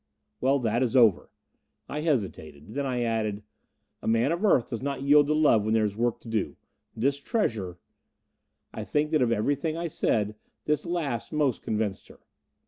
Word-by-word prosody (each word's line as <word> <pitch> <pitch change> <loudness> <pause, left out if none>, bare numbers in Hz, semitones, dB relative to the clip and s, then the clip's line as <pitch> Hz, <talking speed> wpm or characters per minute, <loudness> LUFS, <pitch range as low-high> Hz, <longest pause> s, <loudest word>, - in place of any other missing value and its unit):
"Well, 135 +2 +3
that 115 +1 0
is 125 0 0
over." 115 -7 +4 0.6
I 150 - -4
hesitated. 95 - -3
Then 140 +1 -2
I 125 -2 -1
added, 110 -3 -1 0.6
"A - - -6
man 115 +5 +2
of 170 +4 -2
Earth 160 - +4
does 115 - -4
not 140 -1 -3
yield 145 +1 +5
to 150 - +2
love 145 -9 +4
when 110 +1 +1
there 110 -1 +3
is 100 -1 -3
work 120 +1 0
to - - -14
do. 110 -2 -2 0.4
This 140 +5 +1
treasure 110 - -2 0.5
" - - -51
I - - -5
think 150 +1 0
that 155 -3 +3
of 120 -2 +2
everything 145 +8 0
I 170 - -3
said, 110 -9 0 0.3
this 150 +1 0
last 150 -10 -2
most 145 -5 0
convinced 105 -3 -2
her. - - -16
125 Hz, 185 wpm, -27 LUFS, 110-145 Hz, 0.6 s, yield